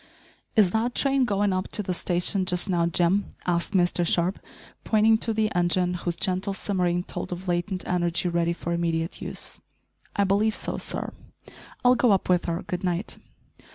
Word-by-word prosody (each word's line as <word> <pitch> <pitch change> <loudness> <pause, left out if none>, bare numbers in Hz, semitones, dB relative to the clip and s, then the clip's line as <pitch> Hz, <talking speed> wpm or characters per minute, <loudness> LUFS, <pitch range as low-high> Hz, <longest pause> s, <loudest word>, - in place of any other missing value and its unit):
"Is 205 -6 +5
that 230 +3 0
train 275 -2 +3
going 205 -3 +1
up 185 0 -1
to 210 - +1
the 185 - -2
station 180 +2 0
just 180 -1 -1
now, 170 -3 +2
Jim?" 175 +4 +1
asked 175 +2 0
Mr 175 -1 +2
Sharp, 175 +2 +1 0.4
pointing 220 0 +4
to 225 - 0
the 220 -1 0
engine, 175 +1 +2
whose 175 -1 -2
gentle 190 +1 -1
simmering 180 -3 0
told - - -6
of 180 +2 -6
latent 180 +2 -1
energy 175 0 0
ready 170 0 +1
for 170 0 -4
immediate 165 -1 -1
use. - - -4 0.6
"I 200 - +3
believe 205 +3 +2
so, - - -3
sir." - - -3 0.7
"I'll 250 - +7
go 245 0 +3
up 190 - 0
with 180 -1 +3
her. 170 +2 -2
Good 180 - -4
night." 180 +2 -2
180 Hz, 175 wpm, -26 LUFS, 175-205 Hz, 0.7 s, I'll